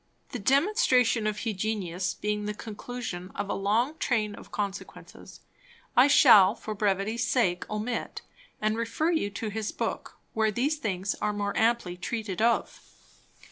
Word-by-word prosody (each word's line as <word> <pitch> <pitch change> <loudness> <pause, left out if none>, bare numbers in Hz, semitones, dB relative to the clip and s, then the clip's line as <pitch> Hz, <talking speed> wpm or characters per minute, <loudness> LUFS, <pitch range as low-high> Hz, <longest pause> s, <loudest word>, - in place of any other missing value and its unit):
The 250 - -5
Demonstration 260 - +3
of 210 0 -2
Hugenius 195 -4 -2
being 210 0 -2
the 210 0 -3
Conclusion 215 -4 -6
of 205 0 -3
a - - 0
long 230 +10 0
Train 215 -4 0
of - - -12
Consequences, 200 -2 -6 0.5
I 250 +3 +7
shall 215 -8 +7
for 215 -1 -6
brevity 205 +1 0
sake 225 -7 0
omit; 215 +3 -4 0.4
and 215 +1 0
refer 230 +8 0
you 315 -12 0
to 215 +2 -5
his 215 0 -3
Book, - - -4 0.2
where 220 -1 +2
these 265 +9 0
things 195 -7 -2
are 210 - 0
more 205 -1 -2
amply 225 -6 +1
treated 215 0 -4
of. 235 +1 +1
215 Hz, 145 wpm, -28 LUFS, 200-235 Hz, 0.5 s, I